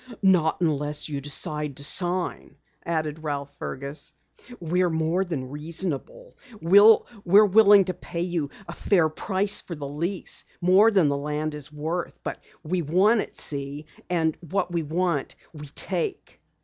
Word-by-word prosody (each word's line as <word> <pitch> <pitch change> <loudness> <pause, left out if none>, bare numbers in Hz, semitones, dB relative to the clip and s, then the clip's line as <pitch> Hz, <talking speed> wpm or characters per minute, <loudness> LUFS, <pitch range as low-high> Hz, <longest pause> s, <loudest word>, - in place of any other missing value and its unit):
"Not 180 -4 +3
unless 150 -2 -1
you 140 -2 -4
decide 145 0 -4
to 140 - -5
sign," 180 +4 -1 0.3
added 155 -2 -2
Ralph 145 -2 -4
Fergus. 140 +3 -6 0.4
"We're 180 +2 +1
more 160 +3 0
than 140 -8 -5
reasonable. 165 - -4 0.2
We're 205 +2 +5
willing 205 -1 +6
to 185 - -2
pay 170 -1 -6
you 170 -5 -2 0.2
a - - -6
fair 175 -6 +2
price 195 +5 0
for 170 - -7
the 145 -2 -6
lease, 170 +7 -3 0.2
more 190 +5 +5
than 190 -8 +3
the 140 0 0
land 150 +2 -3
is 150 0 -8
worth. 160 +4 -4
But - - -6 0.2
we 175 +3 -1
want 190 +8 +3
it, - - -9
see? 140 +1 -4 0.2
And 160 -3 +1
what 180 +2 -2
we 170 -1 0
want 165 -1 -1 0.2
we 150 -1 -9
take." 175 +4 -3
165 Hz, 150 wpm, -25 LUFS, 150-185 Hz, 0.4 s, willing